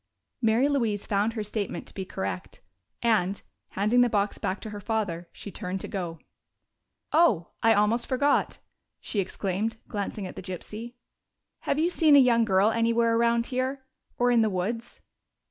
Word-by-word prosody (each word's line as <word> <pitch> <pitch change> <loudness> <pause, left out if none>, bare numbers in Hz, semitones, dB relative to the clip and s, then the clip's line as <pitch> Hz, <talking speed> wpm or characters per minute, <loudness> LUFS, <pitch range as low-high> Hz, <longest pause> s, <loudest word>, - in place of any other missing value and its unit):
Mary 230 +4 +3
Louise 230 -8 0
found 210 +2 +1
her 220 -2 -3
statement 210 0 -3
to - - -14
be 190 - -4
correct, 95 - -5 0.4
and, 205 -4 +1 0.3
handing 215 +5 +3
the 245 - +4
box 205 -2 0
back 185 - -2
to 215 - -7
her 205 - -6
father, 195 -6 -2
she 200 - -9
turned 190 -1 -4
to - - -6
go. 175 -4 -4 1.0
"Oh, 245 - +4
I 225 0 +5
almost 210 +4 +2
forgot!" 280 +2 +1 0.4
she 210 - -3
exclaimed, 195 +3 -2
glancing 205 -1 -4
at 180 - -8
the - - -6
gypsy. 210 +6 -7 0.7
"Have - - +1
you 335 +3 +2
seen 310 -4 +5
a - - +9
young 235 -3 +4
girl 195 +1 +3
anywhere 230 0 +2
around 235 0 +2
here 260 +1 -2 0.3
or 245 0 +3
in 235 -1 +5
the 220 - +3
woods?" 210 +5 -4
220 Hz, 165 wpm, -27 LUFS, 195-235 Hz, 1.0 s, a